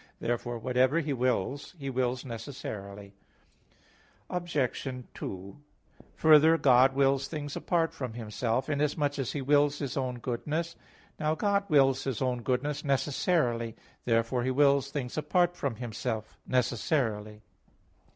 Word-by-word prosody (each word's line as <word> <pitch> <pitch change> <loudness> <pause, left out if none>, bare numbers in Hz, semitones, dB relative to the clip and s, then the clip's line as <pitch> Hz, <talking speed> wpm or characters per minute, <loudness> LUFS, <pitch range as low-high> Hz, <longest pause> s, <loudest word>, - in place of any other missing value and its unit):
Therefore 120 0 -2
whatever 130 +6 +2
He 150 -3 -1
wills, 130 - -1
He 140 -3 -6
wills 125 0 -1
necessarily. 105 -5 -7 1.2
Obj. 170 -8 -1 0.3
2: 95 +4 -7 0.6
Further, 160 +1 +6
God 130 -2 +5
wills 135 0 +2
things 145 -3 -5
apart 165 -2 0
from 125 -4 -5
Himself, 115 +2 -2
inasmuch 145 -1 0
as 135 -1 -2
He 145 - -3
wills 145 +1 +3
His 140 -4 -4
own 130 -2 -2
goodness. 150 +8 -3 0.4
Now 155 0 +1
God 200 +1 0
wills 135 -3 +4
His 130 -5 -2
own 125 -2 -1
goodness 140 +4 -1
necessarily. 135 -4 0 0.3
Therefore 115 +1 +1
He 130 - 0
wills 140 0 +3
things 140 -1 -3
apart 175 +3 +2
from 140 -8 -2
Himself 110 -1 -4
necessarily. 110 -4 0
135 Hz, 125 wpm, -29 LUFS, 120-145 Hz, 1.2 s, Further